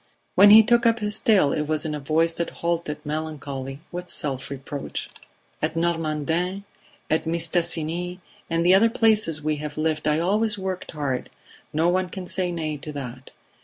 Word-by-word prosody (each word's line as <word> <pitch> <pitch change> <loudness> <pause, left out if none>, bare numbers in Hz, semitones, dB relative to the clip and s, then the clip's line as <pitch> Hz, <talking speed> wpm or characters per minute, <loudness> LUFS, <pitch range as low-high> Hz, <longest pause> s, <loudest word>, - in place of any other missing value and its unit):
When 205 - +7
he 220 +2 +10
took 240 +1 +3
up 230 0 +3
his 210 -1 +2
tale 195 -10 +4
it 150 -1 -2
was 155 0 +2
in 155 - -2
a 150 - -3
voice 160 +4 +1
that 170 0 -3 0.2
halted, 165 -3 -2
melancholy 145 -3 -5
with 180 0 -6
self 140 -3 -3
reproach. 140 +1 -6 0.5
"At 155 +2 -1
Normandin, 165 +3 -1 0.5
at 160 +1 +1
Mistassini 170 +1 0 0.3
and 165 0 0
the 180 - +6
other 215 +4 +6
places 215 -10 +3
we 155 0 0
have 150 0 -6
lived 155 -1 -1
I 150 0 +3
always 205 +5 +1
worked 190 -2 -5
hard; 140 -4 -3 0.4
no 160 +3 +1
one 185 +1 +1
can 185 0 -7
say 180 -1 -1
nay 155 -3 -3
to 150 +2 -8
that. 130 -2 -7
165 Hz, 170 wpm, -24 LUFS, 150-180 Hz, 0.5 s, he